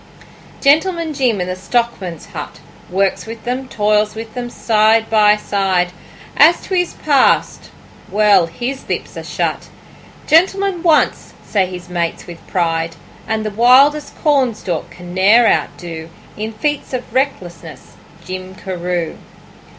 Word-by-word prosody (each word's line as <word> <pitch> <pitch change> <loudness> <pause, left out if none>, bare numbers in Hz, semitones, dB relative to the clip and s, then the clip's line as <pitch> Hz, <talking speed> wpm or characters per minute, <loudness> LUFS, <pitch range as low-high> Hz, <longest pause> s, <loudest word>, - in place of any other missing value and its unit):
Gentleman 320 +3 +2
Jim 250 -7 +1
in - - -1
the 185 - -3
stockmen's 190 -5 -2
hut - - -7 0.3
Works 195 +3 0
with 225 0 -8
them, 255 +2 -3
toils 210 0 +1
with 225 0 -8
them, 245 -1 -5
side 220 -1 +2
by 210 -1 +5
side; 190 -4 0 0.4
As 320 +4 +6
to - - -7
his 355 -1 +1
past 285 -3 +2 0.4
well, 205 -4 +4
his 245 +11 -5
lips - - -4
are - - -6
shut. - - -3 0.6
'Gentleman 375 +3 +2
once,' 325 -3 +1
say 195 -3 +1
his 180 -1 -8
mates 170 -2 -3
with 170 -2 -12
pride; 165 -2 -1 0.3
And 220 0 -2
the 215 - -2
wildest 265 +7 +4
Cornstalk 235 - 0
can 175 0 -11
ne'er 205 +6 +5
outdo 165 -6 -1 0.3
In 215 +1 -4
feats 290 +6 -3
of 255 -1 -5
recklessness, 175 - -3 0.3
Jim 185 +1 -7
Carew. 180 -3 -4
215 Hz, 135 wpm, -17 LUFS, 180-260 Hz, 0.6 s, As